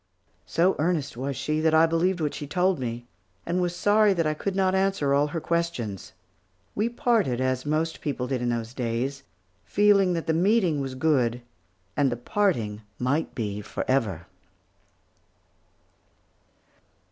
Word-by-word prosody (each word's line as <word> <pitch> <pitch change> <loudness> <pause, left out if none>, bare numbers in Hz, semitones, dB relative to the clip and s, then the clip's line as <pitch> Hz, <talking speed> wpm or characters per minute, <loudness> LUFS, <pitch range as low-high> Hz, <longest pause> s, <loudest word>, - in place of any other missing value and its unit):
So 170 - +2
earnest 155 -4 0
was 135 +2 -4
she, 155 +3 -1
that 160 0 +3
I 160 +1 +6
believed 170 +2 +1
what 150 -2 -1
she 145 - -6
told 180 +2 +1
me, 120 -1 -4 0.4
and 175 +2 0
was 175 -1 -1
sorry 205 +2 +4
that 165 -2 +1
I 155 - +1
could 190 +5 -3
not 190 -1 +2
answer 190 -7 +1
all 145 +1 +3
her 165 +3 -3
questions. 160 - -3 0.6
We 215 +3 0
parted 225 - +1
as 130 +1 -1
most 160 +2 -1
people 135 -4 -2
did 125 -1 -2
in 120 - 0
those 115 0 -3
days, 125 +3 -2 0.4
feeling 200 -3 +3
that 165 -1 -2
the 160 - +1
meeting 180 -3 +2
was 135 -1 -4
good, 125 -5 +1 0.5
and 140 -3 +2
the 120 - -2
parting 120 - 0 0.2
might 140 +6 -1
be 105 -3 -3
forever. 105 -6 -1
150 Hz, 150 wpm, -26 LUFS, 125-180 Hz, 0.6 s, I